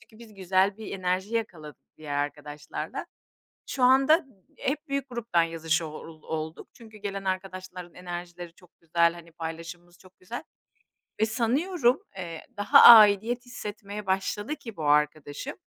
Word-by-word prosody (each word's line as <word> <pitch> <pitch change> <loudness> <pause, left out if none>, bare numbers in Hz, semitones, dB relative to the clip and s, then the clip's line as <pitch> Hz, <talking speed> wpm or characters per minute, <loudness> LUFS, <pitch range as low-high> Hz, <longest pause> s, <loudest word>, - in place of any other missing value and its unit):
Çünkü 220 - -20
biz 230 -2 -14
güzel 190 +1 +1
bir 220 -1 -8
enerji 185 +4 -1
yakaladık 170 -10 -5
diğer 145 -2 -4
arkadaşlarla. 145 0 -5 0.6
Şu 265 - -4
anda 270 +4 +6
m 340 - -14 0.3
hep 290 +2 -3
büyük 275 -1 -2
gruptan 235 -8 0
yazışa 165 0 -1
o 155 - -9 0.3
olduk. 160 0 -5
Çünkü 220 -2 -15
gelen 200 -1 -5
arkadaşların 185 -2 -5
enerjileri 175 -1 -7
çok 180 -1 -23
güzel, 170 0 +2
hani, 170 -1 -13
paylaşımımız 165 +1 -8
çok 185 0 -20
güzel. 230 +7 -7 0.8
Ve 220 - +4
sanıyorum, 250 +5 +1 0.2
eee, 170 -3 -7
daha 205 0 +6
aidiyet 225 +2 +8
hissetmeye 210 -3 -7
başladı 205 +7 -1
ki 230 -7 -10
bu 160 - -5
arkadaşım, 150 - 0
185 Hz, 140 wpm, -27 LUFS, 165-225 Hz, 0.8 s, aidiyet